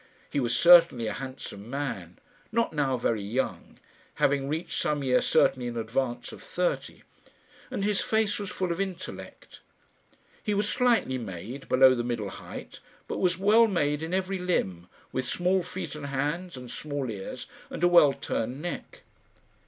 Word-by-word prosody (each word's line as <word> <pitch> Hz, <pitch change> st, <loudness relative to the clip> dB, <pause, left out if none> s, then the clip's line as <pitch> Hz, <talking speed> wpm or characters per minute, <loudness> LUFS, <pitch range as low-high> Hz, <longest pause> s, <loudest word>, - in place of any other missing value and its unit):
He 145 Hz, -, 0 dB
was 120 Hz, -3 st, +1 dB
certainly 170 Hz, -9 st, +7 dB
a 110 Hz, -, -2 dB
handsome 130 Hz, -5 st, -7 dB
man, 120 Hz, -11 st, -4 dB, 0.3 s
not 230 Hz, -3 st, +1 dB
now 140 Hz, -4 st, +1 dB
very 115 Hz, -2 st, 0 dB
young, 115 Hz, +7 st, -3 dB, 0.4 s
having 140 Hz, 0 st, +1 dB
reached 160 Hz, +3 st, -2 dB
some 145 Hz, -2 st, 0 dB
year 125 Hz, -1 st, +3 dB
certainly 125 Hz, -2 st, +3 dB
in 120 Hz, -1 st, -4 dB
advance 120 Hz, +2 st, -2 dB
of -, -, -11 dB
thirty, 180 Hz, 0 st, -2 dB, 0.7 s
and 195 Hz, -, -3 dB
his 210 Hz, -1 st, +1 dB
face 220 Hz, -2 st, +1 dB
was 200 Hz, -2 st, -4 dB
full 185 Hz, -2 st, -2 dB
of 170 Hz, +3 st, -1 dB
intellect. 185 Hz, -2 st, -7 dB, 0.8 s
He 210 Hz, -2 st, -1 dB
was 205 Hz, +1 st, +1 dB
slightly 230 Hz, -, +2 dB
made, 115 Hz, +6 st, -7 dB
below 130 Hz, 0 st, +7 dB
the 120 Hz, -2 st, -1 dB
middle 115 Hz, -4 st, -2 dB
height, -, -, -9 dB, 0.3 s
but -, -, -3 dB
was 180 Hz, -2 st, +2 dB
well 215 Hz, +4 st, +5 dB
made 150 Hz, -7 st, 0 dB
in 160 Hz, +1 st, -4 dB
every 190 Hz, +1 st, -1 dB
limb, 95 Hz, -, -1 dB, 0.2 s
with 130 Hz, -, -2 dB
small 180 Hz, +7 st, +1 dB
feet 185 Hz, +2 st, -6 dB
and 150 Hz, -2 st, -6 dB
hands, 150 Hz, +5 st, -2 dB
and 125 Hz, -1 st, -8 dB
small 145 Hz, -5 st, -3 dB
ears, 100 Hz, -3 st, -6 dB, 0.2 s
and -, -, -5 dB
a -, -, +7 dB
well 170 Hz, -5 st, +7 dB
turned 125 Hz, -1 st, -3 dB
neck. 175 Hz, -, -6 dB
145 Hz, 165 wpm, -28 LUFS, 125-180 Hz, 0.8 s, certainly